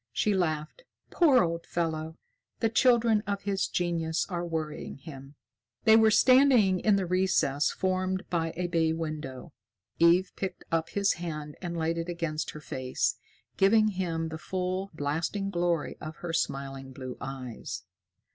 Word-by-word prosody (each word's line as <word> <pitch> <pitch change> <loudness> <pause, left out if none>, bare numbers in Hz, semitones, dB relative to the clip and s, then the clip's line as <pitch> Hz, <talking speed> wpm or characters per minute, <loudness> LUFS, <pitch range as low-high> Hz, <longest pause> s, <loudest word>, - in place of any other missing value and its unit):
She 205 - +1
laughed. 160 - -2 0.3
"Poor 285 - +5
old 170 0 -3
fellow. 160 -1 -2 0.4
The 225 - +2
children 230 -2 +4
of 200 -1 -2
his 195 -1 0
genius 170 -2 -1
are 175 -2 -2
worrying 160 -5 -4
him." 140 -1 -11 0.5
They 220 -1 +7
were 220 0 +6
standing 250 -6 +5
in 210 +1 +3
the 195 -1 0
recess 180 -6 +2
formed 185 0 -1
by 165 -2 0
a 180 - -1
bay 165 -2 +1
window. 155 -3 -5 0.5
Eve 175 +3 +5
picked 190 -2 -5
up 165 -1 0
his 200 0 +2
hand 150 -3 -5
and 170 -2 -4
laid 165 +1 0
it 165 +1 -4
against 165 -2 -3
her 150 - -8
face, 130 -3 -2 0.4
giving 215 +2 +5
him 170 -4 -2
the 160 0 -6
full, 185 +2 -3
blasting 165 +7 -2
glory 175 -3 -1
of 155 0 -6
her 170 +1 -6
smiling 135 -3 -3
blue 130 -1 -7
eyes. 130 -3 -6
170 Hz, 150 wpm, -28 LUFS, 155-190 Hz, 0.5 s, They